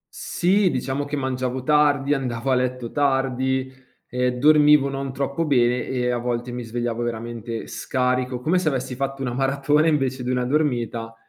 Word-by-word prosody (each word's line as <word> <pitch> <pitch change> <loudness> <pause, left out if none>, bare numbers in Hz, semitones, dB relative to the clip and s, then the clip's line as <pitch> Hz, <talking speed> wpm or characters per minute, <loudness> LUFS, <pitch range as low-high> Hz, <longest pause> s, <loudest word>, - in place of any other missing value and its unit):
Sì, 190 +2 +1
diciamo 135 0 -2
che 145 +1 -4
mangiavo 130 -1 -2
tardi, 145 -1 +3
andavo 130 -2 -2
a - - +4
letto 125 -1 -1
tardi, 130 -2 0 0.4
ehm, 125 0 0
dormivo 150 0 +5
non 135 0 -4
troppo 140 +4 -2
bene 125 -5 +2
e 125 -1 -1
a 120 - -1
volte 120 0 -3
mi 125 0 -5
svegliavo 120 0 -3
veramente 115 -1 -4
scarico, 125 -1 -1
come 160 +8 +1
se 170 - -2
avessi 130 -2 -1
fatto 135 +1 -3
una 125 -2 -2
maratona 140 +4 +2
invece 135 -4 0
di 125 - -3
una 125 -1 0
dormita 120 -5 -1
130 Hz, 165 wpm, -23 LUFS, 125-140 Hz, 0.4 s, dormivo